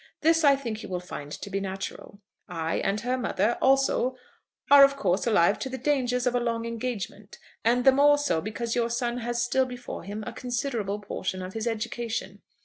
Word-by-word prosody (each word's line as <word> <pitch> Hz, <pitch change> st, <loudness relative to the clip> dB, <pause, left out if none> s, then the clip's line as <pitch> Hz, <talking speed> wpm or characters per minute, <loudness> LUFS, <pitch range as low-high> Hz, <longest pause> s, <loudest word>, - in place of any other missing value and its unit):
This, 325 Hz, +1 st, +4 dB
I 280 Hz, -2 st, +6 dB
think, 230 Hz, -5 st, -5 dB
you -, -, -8 dB
will 180 Hz, -1 st, -2 dB
find 150 Hz, -5 st, -8 dB
to 200 Hz, -, -7 dB
be 195 Hz, -, -1 dB
natural. 195 Hz, +1 st, -6 dB, 0.3 s
"I 165 Hz, -2 st, -2 dB
and 200 Hz, +2 st, 0 dB
her 250 Hz, +2 st, -1 dB
mother 230 Hz, -1 st, 0 dB
also 265 Hz, -1 st, +3 dB, 0.6 s
are 285 Hz, -1 st, +10 dB
of 275 Hz, 0 st, +5 dB
course 195 Hz, -5 st, 0 dB
alive 200 Hz, -3 st, +3 dB
to 265 Hz, -, -3 dB
the 260 Hz, -, -5 dB
dangers 250 Hz, -2 st, 0 dB
of 250 Hz, -, +2 dB
a 245 Hz, -, +2 dB
long 230 Hz, -1 st, -2 dB
engagement, 225 Hz, -3 st, -5 dB, 0.3 s
and 245 Hz, +2 st, +2 dB
the 270 Hz, -, +9 dB
more 290 Hz, +2 st, +5 dB
so 285 Hz, -, 0 dB
because 225 Hz, +4 st, -3 dB
your 235 Hz, -1 st, +1 dB
son 240 Hz, +1 st, -1 dB
has 240 Hz, 0 st, -2 dB
still 255 Hz, +2 st, +1 dB
before 245 Hz, 0 st, -7 dB
him 205 Hz, +4 st, -6 dB
a -, -, -6 dB
considerable 240 Hz, -5 st, -2 dB
portion 190 Hz, -2 st, -4 dB
of 185 Hz, +1 st, -7 dB
his 225 Hz, +1 st, -3 dB
education. 220 Hz, -3 st, -3 dB
235 Hz, 200 wpm, -27 LUFS, 200-255 Hz, 0.6 s, are